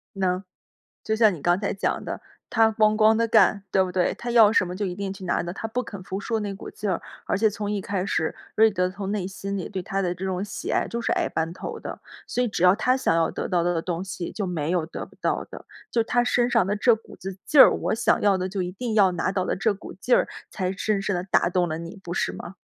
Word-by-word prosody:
能。 185 -1 0 0.6
就 220 - 0
像 220 -2 +5
你 160 - -8
刚 175 +3 +2
才 200 - -1
讲 195 - -1
的， - - -5 0.3
她 225 -1 +4
哐 215 0 +3
哐 215 0 +5
地 230 +1 +1
干， 215 -2 +4
对 190 - +4
不 185 - -4
对？ 180 -1 +1
她 240 - -6
要 225 -3 +7
什 205 -5 +3
么 180 - -5
就 205 +1 -2
一 180 - -3
定 195 0 -4
去 195 -1 -11
拿 175 - +1
的， 175 +1 -5
她 225 - -5
不 240 +3 -2
肯 200 -6 -9
服 190 +2 -4
输 225 +2 -2
那 205 -1 -3
股 195 - -8
劲 210 -1 -4
儿。 175 - -2 0.2
而 - - 0
且 220 +1 +3
从 205 0 -4
一 210 - -1
开 190 -1 -2
始， 160 -5 -1 0.2
瑞 220 +1 +6
德 180 -3 0
从 195 +1 -5
内 205 -4 -1
心 195 +1 -5
里 185 - -5
对 185 - -4
她 195 +2 -2
的 180 -2 0
这 185 +2 -6
种 190 0 -2
喜 205 - -5
爱 - - +1
就 235 - -4
是 - - -1
矮 - - 0
半 160 0 -2
头 - - -6
的， - - -7 0.3
所 250 - 0
以 245 - +1
只 190 - -2
要 180 +1 +7
她 250 +4 +2
想 260 - +1
要 165 -1 +2
得 - - -4
到 175 -2 +1
的 175 -1 0
东 175 0 -3
西 185 -2 -5
就 205 - -3
没 165 -4 -2
有 175 -3 +1
得 - - -7
不 - - -20
到 - - -1
的。 - - -10 0.3
就 230 - +2
她 245 +1 +2
身 245 0 +2
上 230 -6 +3
的 205 - 0
这 230 +3 +4
股 220 - -14
子 190 0 -7
劲 295 - +3
儿， - - +9
我 - - -1
想 225 - +2
要 200 -2 +4
的 185 +1 -2
就 195 -1 -2
一 180 - -3
定 225 +4 -4
要 200 -4 +5
拿 175 +2 -1
到 185 -1 -1
的 - - -1
这 210 +2 +1
股 195 - -10
劲 245 +7 +2
儿 - - +2 0.2
才 185 -2 -2
深 200 0 -1
深 200 -1 -1
地 175 - -2
打 185 -2 +2
动 180 -1 +1
了 160 - -2
你， 170 +4 -8
不 175 - -5
是 - - 0
吗？ 180 - -9
195 Hz, 305 characters per minute, -25 LUFS, 180-215 Hz, 0.6 s, 儿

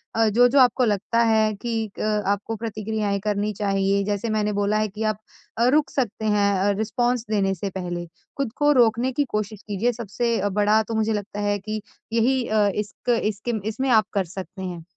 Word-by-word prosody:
अ, 225 0 +3
जो-जो 245 +5 +4
आपको 250 0 +4
लगता 215 +2 0
है 220 -1 +3
कि 225 0 -3
क 215 -1 0
आपको 205 +3 -1
प्रतिक्रियाएँ 215 -2 -2
करनी 210 0 0
चाहिए, 195 0 +1
जैसे 205 +2 -2
मैंने 210 -1 0
बोला 205 +1 +1
है 215 0 +1
कि 210 +2 -6
आप 215 -2 0 0.4
अ, 235 - +3
रुक 300 +2 +3
सकते 230 -4 -2
हैं 205 -1 +3
अ, 200 +2 +2
रिस्पॉन्स 240 +2 0
देने 195 -2 +2
से 195 +3 -4
पहले। 175 -2 -4 0.3
खुद 275 -5 -1
को 295 0 +4
रोकने 240 0 +3
की 285 +3 +1
कोशिश 210 -1 -3
कीजिए। 210 +4 0
सबसे 235 +1 -2
अ, 205 +1 0
बड़ा 210 +2 +3
तो 225 +1 -5
मुझे 220 0 +1
लगता 205 0 -4
है 205 - +1
कि 215 +2 -4 0.3
यही 250 +3 +2
अ, 215 -1 +3
इसक 210 +3 -5
इसके 210 +3 -2 0.2
इसमें 260 +5 -2
आप 220 -3 +5
कर 195 -2 +1
सकते 190 0 -7
हैं। 175 -3 -5
215 Hz, 195 wpm, -23 LUFS, 205-230 Hz, 0.4 s, आप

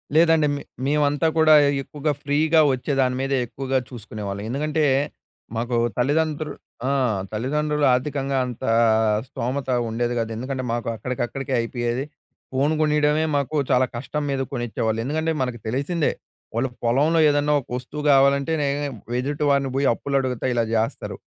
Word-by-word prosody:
లేదండి. 160 -2 +5
మే 140 - -5 0.2
మేమంతా 145 +2 +2
కూడా 160 -1 +6 0.3
ఎక్కువగా 150 +2 -2
ఫ్రీగా 155 +3 +3
వచ్చే 130 +3 -3
దాని 125 -1 +1
మీదే 135 0 0
ఎక్కువగా 135 +2 -2
చూసుకునేవాళ్ళం. 105 -4 -6
ఎందుకంటే 150 +4 0 0.7
మాకు 120 +1 -1 0.2
తల్లిదండ్రు 150 +3 0 0.4
ఆ! - - +1 0.4
తల్లిదండ్రులు 150 +6 0
ఆర్థికంగా 135 +1 -1
అంత 125 -2 -7 0.6
స్థోమత 130 +2 -3 0.2
ఉండేది 120 +2 -1
కాదు. 115 0 -2
ఎందుకంటే 130 +3 -4
మాకు 120 0 -3
అక్కడికక్కడికే 125 +3 -3
అయిపోయేది. 120 +2 -2 0.5
ఫోను 140 +4 +2
కొనియడమే 150 0 +2
మాకు 140 +2 -1 0.2
చాలా 130 0 +4
కష్టం 140 +5 -3
మీద 135 -1 -1
కొనిచ్చేవాళ్ళు. 110 -2 -1
ఎందుకంటే 160 +5 -1
మనకు 125 -2 -2
తెలిసిందే 140 +7 0 0.4
వాళ్ళుకు 125 +1 -1
పొలంలో 145 +8 +3
ఏదన్నా 145 0 +2
ఒక - - -23
వస్తువు 140 +4 -7
కావాలంటేనే 140 +2 +3 0.5
ఎదుటి 145 +3 -2
వారిని 140 -1 +2
పోయి 140 +1 +2
అప్పులు 140 +4 -2
అడుగుత 130 -3 -3
ఇలా 120 -1 +2
చేస్తారు. 110 +1 -2
135 Hz, 135 wpm, -23 LUFS, 125-150 Hz, 0.7 s, కూడా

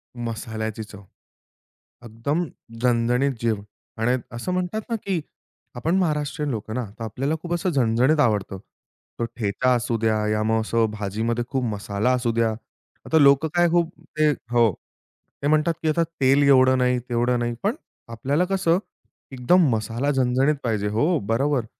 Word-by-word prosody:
मसाल्याची 110 -2 -4
चव. 100 -1 -12 1.0
एकदम 130 +10 -2 0.4
झणझणीत 125 +3 +2
जेवण 110 -3 0 0.4
आणि 125 +3 +2 0.2
असं 150 +10 -3
म्हणतात 185 +4 -2
ना, 230 - 0
की 195 -6 -2 0.5
आपण 160 +9 0
महाराष्ट्रीयन 150 -4 -1
लोकं 110 -1 -4
ना. 125 -2 -2
तर - - -5
आपल्याला 135 +8 -2
खूप 175 0 -4
असं 175 +2 0
झणझणीत 130 +3 +2
आवडतं. 105 -6 +1 0.6
तो 115 - 0
ठेचा 120 +3 +1
असू 120 -1 -1
द्या, 110 -1 +1
या 110 0 +1
मग 110 0 +1
असं 115 +1 +1
भाजीमध्ये 110 +3 -2
खूप 130 -1 -1
मसाला 100 +4 -1
असू 125 -2 0
द्या. 115 -1 +1 0.5
आता 160 - +2
लोकं 140 +2 +5
काय 175 -1 +4
खूप 170 -1 +2 0.3
ते 155 0 +4 0.2
हो. 120 -3 +4 0.7
ते - - +2
म्हणतात, 155 +2 +3
की 155 - +2
आता 165 +2 +2 0.2
तेल 135 +2 +4
एवढं 130 -1 +5
नाही 125 0 +2
तेवढं 120 +1 +1
नाही. 120 0 -1
पण 215 +7 +1 0.3
आपल्याला 140 +9 0
कसं 185 -2 +1 0.5
एकदम 145 +7 +3
मसाला 115 +6 -1
झणझणीत 135 +2 +2
पाहिजे. 105 -3 -1
हो, 145 - +1
बरोबर. 120 +4 0
125 Hz, 155 wpm, -23 LUFS, 115-150 Hz, 1.0 s, लोकं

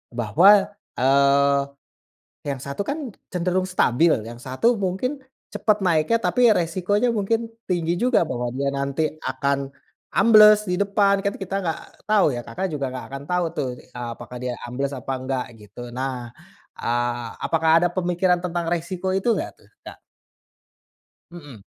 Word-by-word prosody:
Bahwa, 175 - +5 0.3
eee, 140 +1 +3 0.8
yang 140 -2 -3
satu 140 +8 -5
kan 285 -1 -4 0.2
cenderung 180 +1 0
stabil, 165 -2 +3 0.2
yang 120 0 -8
satu 135 - +1
mungkin 200 +8 -2 0.3
cepat 210 0 +1
naiknya 180 +4 +2
tapi 245 -1 +3
resikonya 185 +5 +1
mungkin 225 +3 0 0.2
tinggi 170 -1 0
juga 245 +3 +2
bahwa 120 -2 -3
dia 140 +2 -2
nanti 140 +2 -2 0.2
akan 135 +1 -1 0.4
ambles 215 0 +7
di 180 +2 0
depan, 200 0 +2
kan 200 0 -2
kita 195 0 -5
gak 165 -4 -2 0.3
tau 210 -8 +4
ya, 120 - -3
Kakak 175 +10 -4
juga 140 -3 -2
nggak 130 0 -6
akan 140 0 -6
tau 180 -1 0
tuh, 145 -6 -3
eee, 125 -1 -8
apakah 125 - -9
dia 125 -1 -3
ambles 135 +3 -3
apa 130 +1 -6 0.2
gak 130 -2 -1
gitu. 120 +3 -10
Nah, 125 -2 -4 0.5
eee, 120 0 -1 0.2
apakah 160 -1 +2
ada - - +4
pemikiran 180 0 +1
tentang 175 -1 -2
resiko 175 +2 -2
itu 195 +5 -1
gak - - -3
tuh - - -23 0.2
Kak? - - -10 1.4
Mhm. 145 - -11
170 Hz, 150 wpm, -23 LUFS, 135-195 Hz, 1.4 s, ambles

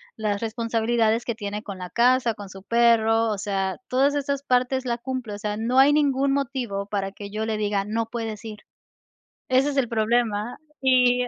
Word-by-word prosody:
las 210 -2 -1
responsabilidades 230 0 0
que 235 - -2
tiene 210 -1 -5
con 200 -4 -8
la 180 -1 -6
casa, 245 -1 +3
con 205 -2 -9
su 190 0 -12
perro, 225 0 +3
o 205 - -2
sea, 195 -1 -2
todas 275 +3 +2
esas 280 -1 -2
partes 255 +1 +1
la 235 -1 -1
cumple, 245 -3 -5
o 205 - -5
sea, 210 0 -3
no 240 +4 -1
hay 275 +2 +7
ningún 280 -2 +2
motivo 250 -8 -2
para 200 -1 -3
que 200 0 -9
yo 215 +1 -3
le 220 -1 -1
diga: 205 -2 0
“No 225 +3 -2
puedes 225 -2 -5
ir”. 210 -1 -7 0.9
Ese 260 +2 +3
es 280 - -5
el 245 -4 +2
problema, 225 0 0 0.2
y 250 -1 +4
230 Hz, 190 wpm, -24 LUFS, 210-255 Hz, 0.9 s, hay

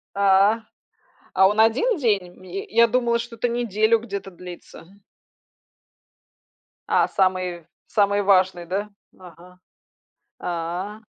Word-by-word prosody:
А. 200 +3 +4 0.7
А 190 0 +5
он 210 +2 0
1 260 - +3
день? 205 -8 0
М 175 - -19
ме 185 +1 -6
э, - - -17
я 235 +1 +5
думала, 235 0 +1
что-то 235 0 -3
неделю 230 -1 +1
где-то 200 -3 -6
длится. 175 -1 -12 2.0
А, - - +3
самый, 185 -3 -1 0.2
самый 205 -1 +2
важный, 185 -3 +2
да? 200 +4 -3 0.3
Ага. 180 +1 -15 0.8
А. 180 +5 -4
200 Hz, 115 wpm, -23 LUFS, 180-225 Hz, 2.0 s, А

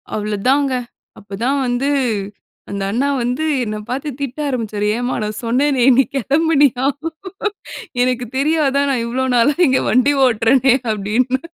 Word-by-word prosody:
அவ்ளோ 210 0 -2
தாங்க. 275 0 +2 0.5
அப்பதான் 225 +8 -2
வந்து 245 +3 0 0.8
அந்த 200 -1 -4
அண்ணா 250 +6 0
வந்து 245 +5 -1 0.2
என்ன 215 -2 -4
பாத்து 270 +4 -3
திட்ட 275 +1 -4
ஆரம்பிச்சாரு. 220 -6 -2
ஏம்மா! 245 +1 -2
நான் 210 0 -4
சொன்னேனே! 260 +2 +1
நீ 270 - +6
கிளம்புனியா? 280 -1 +2 1.2
எனக்கு 250 -1 -1
தெரியாதா? 280 -1 +2
நான் 245 -3 0
இவ்ளோ 255 +3 -1
நாளா 245 +5 +4
இங்க 260 0 +2
வண்டி 255 +3 +3
ஓட்றேனே, 245 +2 +3 0.2
அப்பிடின்னு. 225 +5 0
255 Hz, 130 wpm, -18 LUFS, 230-275 Hz, 1.2 s, நீ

